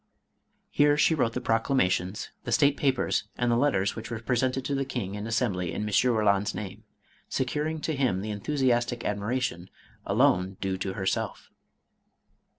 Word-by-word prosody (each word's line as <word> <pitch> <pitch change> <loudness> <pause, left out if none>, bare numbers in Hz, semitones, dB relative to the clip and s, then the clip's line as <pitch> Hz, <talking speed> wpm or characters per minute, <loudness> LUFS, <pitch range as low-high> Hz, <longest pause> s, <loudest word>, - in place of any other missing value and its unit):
Here 145 0 +4
she 155 - +4
wrote 120 -7 +1
the 125 - -3
proclamations, 115 -5 0
the - - -4
state 145 -2 +4
papers, 135 -3 +1
and 120 -1 +1
the - - +3
letters 115 -7 +2
which 110 - -7
were 115 - -3
presented 130 +2 0
to 145 - -1
the 135 0 0
King 120 -7 -4
and 105 +1 -5
Assembly 105 -7 0
in - - -3
M. 105 - -2
Eoland's 105 -3 +2
name, 100 -3 -7 0.4
securing 150 +5 -1
to 160 - -1
him 125 -9 +1
the 105 +1 -4
enthusiastic 120 +1 0
admiration 105 -3 -2 0.3
alone 95 +1 +2
due 95 -1 -2
to 95 -1 -2
her 95 - -4
self. - - -2
115 Hz, 160 wpm, -27 LUFS, 100-130 Hz, 0.4 s, Here